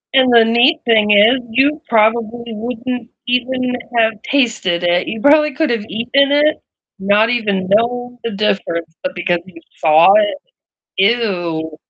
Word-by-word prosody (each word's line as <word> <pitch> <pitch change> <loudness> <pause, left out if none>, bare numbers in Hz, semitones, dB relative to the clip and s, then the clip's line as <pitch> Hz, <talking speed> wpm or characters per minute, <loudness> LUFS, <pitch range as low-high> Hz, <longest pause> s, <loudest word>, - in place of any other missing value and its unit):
And 260 -1 +4
the 230 -1 +5
neat 240 +8 +3
thing 220 -2 +2
is 215 +6 +4
you 285 +6 +1
probably 225 +1 +1
wouldn't 240 +2 -6 0.2
even 250 0 -1 0.2
have 225 -1 +2 0.2
tasted 225 -10 0
it. 175 +1 0
You 220 - -5
probably 300 0 +3
could 310 -3 0
have 230 -3 -2
eaten 270 +5 0
it 300 +1 +2 0.4
not 205 +3 +2
even 200 -6 -2
known 245 +4 -1
the 230 - -4
difference, 170 -5 -3
but 275 - -4
because 175 0 -1
you 170 -3 -14 0.2
saw 160 +4 +5
it, 210 +5 +2 0.6
ew. 175 -7 -1
230 Hz, 145 wpm, -16 LUFS, 195-250 Hz, 0.6 s, the